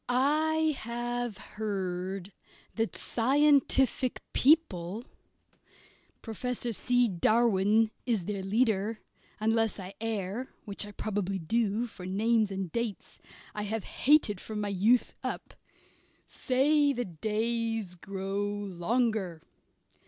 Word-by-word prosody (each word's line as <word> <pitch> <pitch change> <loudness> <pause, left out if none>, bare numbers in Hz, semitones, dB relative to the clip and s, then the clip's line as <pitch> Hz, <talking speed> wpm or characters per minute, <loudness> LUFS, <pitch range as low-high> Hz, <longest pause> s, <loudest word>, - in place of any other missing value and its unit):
I 310 +4 +2
have 240 -1 -3
heard 190 -2 -4 0.4
that 225 -1 -1
scientific 270 0 +3
people 230 - +2 1.2
Professor 240 +1 -3
C. 245 +3 +2
Darwin 215 +2 +3 0.2
is 220 -8 +1
their 200 0 -3
leader, 215 +1 +1 0.4
unless 225 0 +1
I 190 0 -7
err 225 +2 -2 0.2
which 205 0 -3
probably 200 -2 -2
I 175 -4 -5
do, 225 +3 +1
for 185 -6 -9
names 215 +2 +2
and 190 -3 -4
dates 235 -1 -4 0.3
I 210 - -3
have 210 0 -2
hated 255 -9 +3
from 215 -1 -5
my 205 -1 -1
youth 210 +6 +3
up - - -5 0.7
say 285 +2 +2
the 245 -2 -2
days 220 +2 -1
grow 195 +2 -4
longer. 205 -2 -1
220 Hz, 105 wpm, -30 LUFS, 195-240 Hz, 1.2 s, scientific